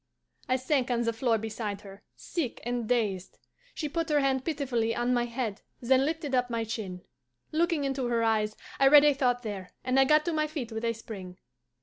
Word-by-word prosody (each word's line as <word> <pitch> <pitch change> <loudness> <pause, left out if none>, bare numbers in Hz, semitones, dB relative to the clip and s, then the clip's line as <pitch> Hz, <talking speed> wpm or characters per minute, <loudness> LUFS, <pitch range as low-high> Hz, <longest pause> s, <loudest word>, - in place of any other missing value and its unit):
I 255 - +4
sank 260 0 0
on 240 -1 +1
the 230 0 0
floor 225 0 +1
beside 215 -2 -4
her, 195 0 -12
sick 315 -10 -4
and 240 -2 -2
dazed. 205 -7 0 0.4
She 305 - -2
put 330 +2 -2
her 300 -1 +3
hand 265 -2 +1
pitifully 255 -7 -1
on 240 +1 +1
my 240 -1 +2
head, 235 -3 -3 0.2
then 260 +2 +3
lifted 310 -2 -3
up 250 -1 +2
my 230 -1 -1
chin. 205 -5 -5 0.5
Looking 330 -1 +1
into 270 -2 -1
her 235 -1 +1
eyes, 215 -1 +1 0.2
I 275 - +6
read 295 +1 +8
a 295 - +6
thought 250 -2 +1
there, 200 -4 -5
and 255 +1 +2
I 270 - +6
got 305 +2 +4
to 340 - 0
my 305 -1 +1
feet 285 -7 -5
with 220 +1 -3
a 230 - +1
spring. 195 -5 -9
245 Hz, 210 wpm, -29 LUFS, 225-275 Hz, 0.5 s, read